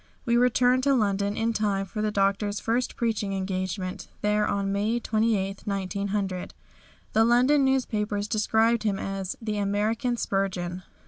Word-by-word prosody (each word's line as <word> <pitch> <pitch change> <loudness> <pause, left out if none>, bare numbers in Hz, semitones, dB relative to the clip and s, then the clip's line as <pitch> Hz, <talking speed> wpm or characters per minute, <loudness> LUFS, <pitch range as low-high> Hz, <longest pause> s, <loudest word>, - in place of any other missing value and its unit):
We 235 - +2
returned 250 +1 +4
to 275 -1 +4
London 200 -3 0
in 230 +1 0
time 205 -3 0
for 210 +3 -5
the 215 - +1
Doctor's 205 0 0
first 240 +2 -1
preaching 220 -4 -1
engagement 185 -1 -3 0.2
there 210 0 +2
on 200 -1 -1
May 210 +4 0
28, 215 -4 0
1900. 195 -1 -2 0.6
The 220 - +5
London 250 +5 +4
newspapers 215 -6 0
described 220 +1 +2
him 205 -3 0
as 195 -1 -4
"The 215 -2 -3
American 215 +4 0
Spurgeon." 185 -4 -2
210 Hz, 140 wpm, -26 LUFS, 195-230 Hz, 0.6 s, The